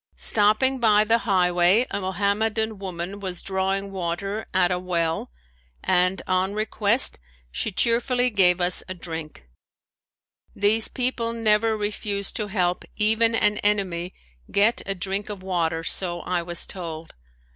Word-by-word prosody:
Stopping 215 +5 +3
by 215 -3 +4
the 225 +2 +2
highway 180 +4 +3
a - - -3
Mohammedan 210 +3 -1
woman 190 +1 -6
was 185 -3 -5
drawing 195 +1 -2
water 195 +3 -4
at 185 -1 +2
a 180 - 0
well 170 - -2 0.5
and 180 +1 +1
on 185 +2 0
request 215 +2 +2 0.3
she 210 - -3
cheerfully 245 +4 +1
gave 185 -3 +4
us 180 0 +3
a 185 - -5
drink. 160 - -8 1.1
These 215 +2 +3
people 245 -2 -2
never 220 -1 +2
refuse 205 -1 -1
to 215 - -4
help 180 -3 -1
even 225 +2 +2
an 210 -1 +1
enemy 185 -4 -1 0.3
get 210 +4 +2
a 195 - -2
drink 195 +3 -3
of 200 -3 -7
water 165 -3 -1
so 175 0 +2
I 180 -1 -2
was 170 0 0
told. 165 -3 -7
195 Hz, 135 wpm, -24 LUFS, 180-215 Hz, 1.1 s, by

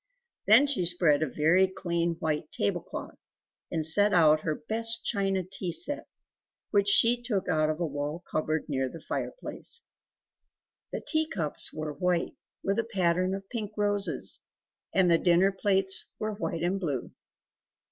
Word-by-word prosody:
Then 285 - +7
she 280 -10 0
spread 170 -4 +3
a 155 - +1
very 165 +7 +3
clean 170 -2 -2
white 155 -2 -3
table 100 - -1
cloth, - - -8 0.5
and 160 -2 0
set 205 +5 +5
out 155 -3 +5
her 155 0 -2
best 230 +2 -2
china 195 -3 0
tea 185 0 -3
set, 285 - 0 0.6
which 200 -2 +3
she 235 +4 +4
took 220 -6 -2
out 155 -3 +2
of 155 +1 -2
a 175 - 0
wall 145 +3 -4
cupboard 155 0 -1
near 135 -3 -1
the 165 - -10
fireplace. 465 - -4 1.1
The - - -4
tea 315 -1 +1
cups 155 -7 0
were 155 -1 -5
white 180 0 -1 0.3
with 195 +3 0
a - - +1
pattern 185 -4 0
of 195 0 -8
pink 215 -4 -4
roses; 205 -6 0 0.5
and 185 -2 +3
the 165 - +4
dinner 180 +2 +4
plates 190 -1 +1
were 215 0 -3
white 170 -5 -3
and 185 +3 0
blue. 145 -9 -3
180 Hz, 155 wpm, -28 LUFS, 160-205 Hz, 1.1 s, Then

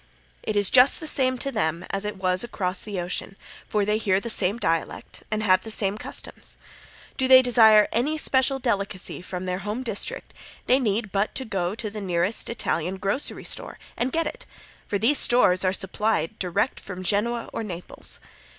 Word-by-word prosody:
It 215 - -3
is 205 -2 +4
just 255 +1 +6
the 320 - -7
same 260 -4 +2
to 275 +3 -2
them 165 - -2
as 195 +1 -1
it 210 - -4
was 185 +1 0
across 185 -6 -2
the 205 -3 -4
ocean, 180 +2 -4 0.3
for 210 -1 0
they 210 +1 0
hear 195 -3 +1
the 230 +3 -1
same 200 +2 +2
dialect 165 -8 -3
and 215 0 -2
have 185 -2 +3
the 225 - -8
same 205 -2 +2
customs. - - -4 0.6
Do 260 - +1
they 260 0 +8
desire 220 -4 +6
any 285 +7 0
special 270 -2 +3
delicacy 200 -9 -2
from 180 0 -6
their 180 0 -3
home 210 +6 -4
district, 250 - -2 0.3
they 255 +2 +3
need 215 -3 -1
but 200 +6 -1
go 190 -1 -2
to 220 -2 -4
the 210 0 -7
nearest 180 +2 0
Italian 190 -5 -2
grocery 200 +8 0
store - - -2 0.2
and 250 +2 -2
get 330 +3 0
it, - - -7 0.4
for 205 - -1
these 240 +8 +4
stores 185 -7 +4
are 185 - +2
supplied 205 0 -2
direct 180 +8 -1
from 185 -1 -8
Genoa 230 +5 0
or - - -3
Naples. 180 -5 -5
210 Hz, 185 wpm, -24 LUFS, 185-240 Hz, 0.6 s, they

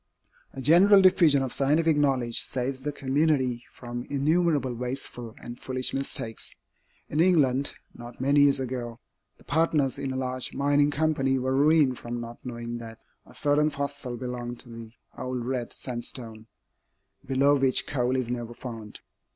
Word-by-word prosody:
A 135 - -6
general 185 +8 +7
diffusion 160 -7 +5
of 130 - -3
scientific 155 +3 +2
knowledge 135 -5 +1
saves 130 +1 -3
the 150 +2 -2
community 135 -3 0
from 120 0 -7
innumerable 145 -1 +1
wasteful 125 -1 -5
and 120 +1 -9
foolish 130 -1 -2
mistakes. 125 -4 -4 0.5
In 150 - -2
England, 140 -6 +3 0.2
not 120 0 -11
many 140 +3 +3
years 140 -1 +5
ago, 125 -2 -4 0.4
the - - -18
partners 150 -3 +1
in 135 - -3
a - - -4
large 130 -1 -3
mining 145 +1 +3
company 145 -3 +1
were 130 +1 -1
ruined 145 -2 +4
from 120 0 -5
not 120 0 -8
knowing 120 -1 -5
that 115 -1 -9 0.3
a - - -16
certain 150 +1 +2
fossil 140 -4 -4
belonged 120 -1 -5
to 120 - -14
the 115 -1 -9 0.3
old 125 -2 -3
red 125 -2 -3
sandstone, 120 -2 -6 0.8
below 140 +2 +3
which 135 -2 +2
coal 125 -2 0
is 130 -2 -1
never 120 -1 -4
found. 115 -4 -8
130 Hz, 150 wpm, -27 LUFS, 120-145 Hz, 0.8 s, general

